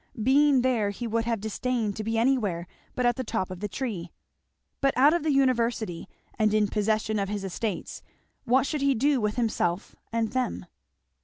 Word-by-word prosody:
Being 275 +1 +4
there 235 -6 +2
he 205 +4 -5
would 230 0 -1
have 230 -2 0
disdained 220 0 -2
to 215 - -4
be 225 +1 -1
anywhere 225 -9 +1 0.3
but 250 - 0
at 240 0 +2
the 260 - -2
top 220 -5 -2
of 185 - -6
the 210 - -3
tree. 195 -6 -4 0.7
But 275 -2 +2
out 285 +4 +6
of 345 - +1
the 310 - -1
University 235 - +1 0.3
and 215 -1 +3
in 210 -1 +2
possession 215 0 0
of 195 -1 -1
his 205 -1 -3
estates, 195 0 -4 0.4
what 260 +3 +3
should 300 0 -2
he 275 -1 +3
do 275 +2 +2
with 210 0 0
himself 210 -6 -1 0.2
and 230 -1 0
them? 255 -1 -2
230 Hz, 185 wpm, -27 LUFS, 210-255 Hz, 0.7 s, out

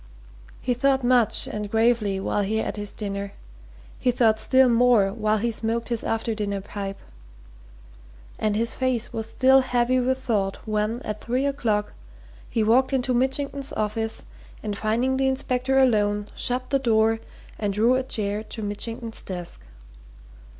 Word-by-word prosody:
He 250 - 0
thought 265 +1 +2
much 245 -3 +3
and 210 -1 -5
gravely 220 -3 +2
while 205 - -1
he 210 +2 -1
ate - - -2
his 205 -1 -4
dinner; 200 -1 -5 0.7
he 250 - +1
thought 225 -3 +3
still 260 +4 +4
more 235 -5 +4
while 215 -1 +1
he 230 +3 0
smoked 230 +1 -2
his 235 -2 -1
after 225 0 -1
dinner 205 -2 -2
pipe. 195 0 -6 1.4
And 215 -1 0
his 230 +1 +1
face 255 -3 -1
was 225 -1 -4
still 265 +2 +5
heavy 250 0 +1
with 260 +1 +1
thought 210 -7 -1
when, 215 +3 -1
at 210 0 -5
three 255 +4 -1
o'clock, 225 -7 -1 0.6
he 225 - 0
walked 255 +5 +3
into 255 -1 +1
Mitchington's 270 +2 0
office 220 +1 -2 0.4
and 210 -1 -3
finding 235 +6 0
the 270 0 +2
inspector 265 0 0
alone 210 -5 +2
shut 255 +1 0
the 275 - +3
door 225 -3 +2 0.4
and 205 -2 0
drew 220 +5 +3
a 260 - +2
chair 210 -5 -2
to 220 0 -7
Mitchington's 225 +2 -3
desk. 175 -2 -6
225 Hz, 155 wpm, -24 LUFS, 210-255 Hz, 1.4 s, still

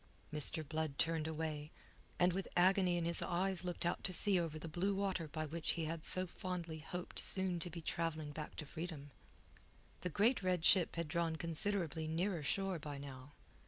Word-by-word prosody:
Mr. 150 +1 +1
Blood 155 -2 -2
turned 160 -1 +1
away, 155 -1 -3 0.5
and 180 0 +4
with 190 +1 -2
agony 185 0 +4
in 170 - -1
his 170 0 +3
eyes 185 0 0
looked 175 -1 -2
out 175 - -1
to 190 - +3
sea 190 +1 +5
over 165 -2 -2
the 155 - -6
blue 185 +5 0
water 190 -4 -1
by 155 +1 -3
which 165 +2 -2
he 165 - -2
had 160 0 -3
so 185 0 +6
fondly 175 -3 -5
hoped 180 +3 -4
soon 190 -2 +2
to 175 - 0
be 170 0 -7
travelling 160 -2 -2
back 150 +1 -7
to 155 - -5
freedom. 160 -2 -6 0.9
The 180 - -3
great 220 - +3
red 180 -3 +1
ship 180 -4 +5
had 170 -1 -2
drawn 165 +1 0
considerably 165 -1 -1
nearer 170 +2 -1
shore 190 +4 0
by 145 -1 -6
now. 140 0 -9
170 Hz, 190 wpm, -37 LUFS, 155-180 Hz, 0.9 s, so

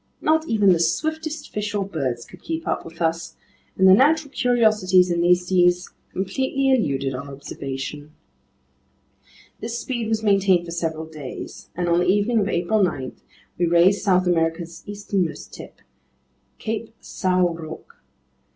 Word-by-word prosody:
Not 315 +1 +2
even 205 -4 +4
the 170 - 0
swiftest 315 - -2
fish 210 0 -3
or 200 -1 0
birds 130 -10 -3
could - - -15
keep 325 0 -4
up - - -1
with 165 +1 -6
us, 165 0 -1 0.4
and 190 - +5
the 185 - +9
natural 290 +6 +3
curiosities 215 -8 +3
in 170 0 +1
these 180 +1 +3
seas 180 0 +2 0.2
completely 265 +8 0
eluded 140 - +1
our 140 +2 -6
observation. 140 +1 -6 1.5
This 230 +1 -4
speed 240 -1 -3
was 220 -1 0
maintained 195 -4 +3
for 170 - -7
several 160 -2 -3
days, 155 -4 -9
and 175 0 -1
on 170 0 +3
the 180 - +1
evening 205 +4 +2
of 205 -1 0
April 180 +5 +1
9, 135 -9 -1 0.4
we 175 - +2
raised 175 +4 +4
South 185 -3 +3
America's 165 -1 -1
easternmost 200 -4 -3
tip, - - -11 0.8
Cape 225 0 -5
São 180 -2 0
Roque. 160 -1 -10
185 Hz, 150 wpm, -23 LUFS, 165-220 Hz, 1.5 s, the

